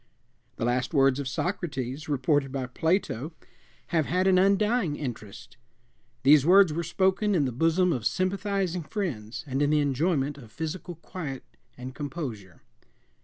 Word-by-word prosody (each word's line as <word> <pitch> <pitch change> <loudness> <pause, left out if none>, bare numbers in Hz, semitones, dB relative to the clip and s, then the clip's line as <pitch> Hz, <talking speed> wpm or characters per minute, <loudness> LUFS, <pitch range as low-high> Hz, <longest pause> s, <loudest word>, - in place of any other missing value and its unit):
The - - -2
last 125 +4 -1
words 135 -1 +4
of 140 - -3
Socrates, 140 - -3
reported 140 0 +1
by 135 -1 -3
Plato, 160 - -1 0.6
have 160 -4 +1
had 180 +3 +1
an 185 -1 +5
undying 200 -2 +2
interest. 120 -2 -7 0.7
These 140 +1 +7
words 180 0 +6
were 170 - -1
spoken 190 +4 +1
in 150 -5 +2
the 130 - -1
bosom 165 +7 +2
of 120 -4 -1
sympathizing 185 -1 -1
friends 150 - -4
and 135 0 -2
in 145 - +3
the 150 0 +3
enjoyment 145 0 0
of 115 -5 -14
physical 170 +2 -5
quiet 155 -5 -7 0.3
and 125 +1 -7
composure. 130 - -6
150 Hz, 145 wpm, -27 LUFS, 130-180 Hz, 0.7 s, These